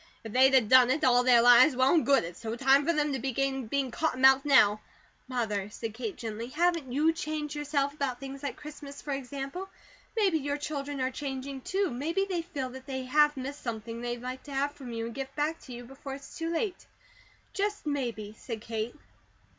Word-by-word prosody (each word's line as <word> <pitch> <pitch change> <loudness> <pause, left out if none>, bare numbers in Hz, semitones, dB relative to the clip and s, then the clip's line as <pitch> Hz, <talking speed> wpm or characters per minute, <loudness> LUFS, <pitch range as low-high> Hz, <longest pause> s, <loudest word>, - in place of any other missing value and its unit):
If 225 -2 -8
they'd 265 +1 +6
a 260 - +7
done 250 +3 +6
it 295 +4 +1
all 245 -1 +5
their 245 -2 +6
lives, 245 +3 +7
well 260 +1 +4
and 330 - +4
good; 275 -2 +4
it's 170 +6 -8
no 225 0 -3
time 275 +3 +4
for - - +5
them 300 -3 0
to 265 - -2
begin 270 0 -1
being 270 +1 -1
cotton 285 -2 -1
mouthed 265 +1 +6
now." 215 -7 +5 0.5
"Mother," 215 -6 -2
said 220 +1 -6
Kate 225 -3 -5
gently, 225 0 -5
"haven't 325 -1 0
YOU 305 +5 +3
changed, 310 -3 -4
yourself, 290 -1 -1
about 275 -4 -3
things 275 0 -8
like 285 -2 -4
Christmas, 295 -1 -9
for 290 - -6
example? 275 +7 -5 0.5
Maybe 385 -7 +3
your 285 0 -2
children 285 -2 -4
are 255 0 0
changing, 270 0 -5
too. 385 +5 -1
Maybe 325 +10 -1
they 360 -3 -1
feel 290 -7 -5
that 260 +1 -11
they 260 -1 -3
have 295 +3 +3
missed 275 +3 -5
something 230 0 -5
they'd 240 0 -4
like 255 +1 -5
to 285 - -8
have 280 +1 +1
from 265 -4 -10
you, 230 0 -3
and 230 - -6
give 270 +1 -6
back 305 +2 -1
to 260 - -11
you, 245 0 -7
before 270 +2 -8
it's 275 0 -12
too 330 0 -3
late. 360 +3 -3 0.7
Just 415 -1 -2
maybe," 235 -8 -3
said 225 -3 -6
Kate. 225 +1 -4
270 Hz, 210 wpm, -29 LUFS, 245-295 Hz, 0.7 s, a